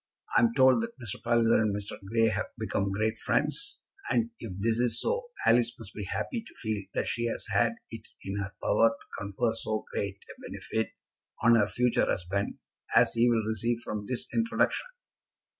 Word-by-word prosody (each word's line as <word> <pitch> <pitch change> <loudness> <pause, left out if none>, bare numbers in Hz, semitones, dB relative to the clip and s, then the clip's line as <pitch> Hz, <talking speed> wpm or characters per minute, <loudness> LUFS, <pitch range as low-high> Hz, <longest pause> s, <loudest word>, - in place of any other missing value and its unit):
I'm 115 -1 +5
told 130 - +6
that 230 +1 -5
Mr. 115 -5 -6
Palliser 115 -1 +4
and 105 -2 +1
Mr. 100 -1 -6
Grey 115 +3 +2
have 110 +1 -1
become 100 -3 -1
great 110 +3 0
friends, 410 - 0 0.3
and 235 0 +1
if 115 - -6
this 115 +3 +1
is 120 -2 +1
so, 480 0 -1 0.2
Alice 120 0 +4
must 110 -3 -10
be 105 - -5
happy 230 - -2
to 220 - -15
feel 110 -3 -2
that - - +1
she 120 - -1
has 115 - -2
had 115 -1 +3 0.2
it 115 -1 -8 0.2
in 95 +1 -3
her 100 0 -3
power 115 +2 +5
to 140 - -10
confer 100 +4 -1
so 110 -1 -2
great 100 -1 -2 0.2
a - - -19
benefit 110 0 -3 0.5
on 120 - +7
her 105 -3 +5
future 125 +2 +2
husband 95 +3 -1 0.4
as - - +6
he 115 +1 +4
will 115 -2 +2
receive 115 +2 -1
from 105 -2 -4
this 125 -2 -3
introduction." 230 - +1
115 Hz, 185 wpm, -29 LUFS, 105-120 Hz, 0.5 s, on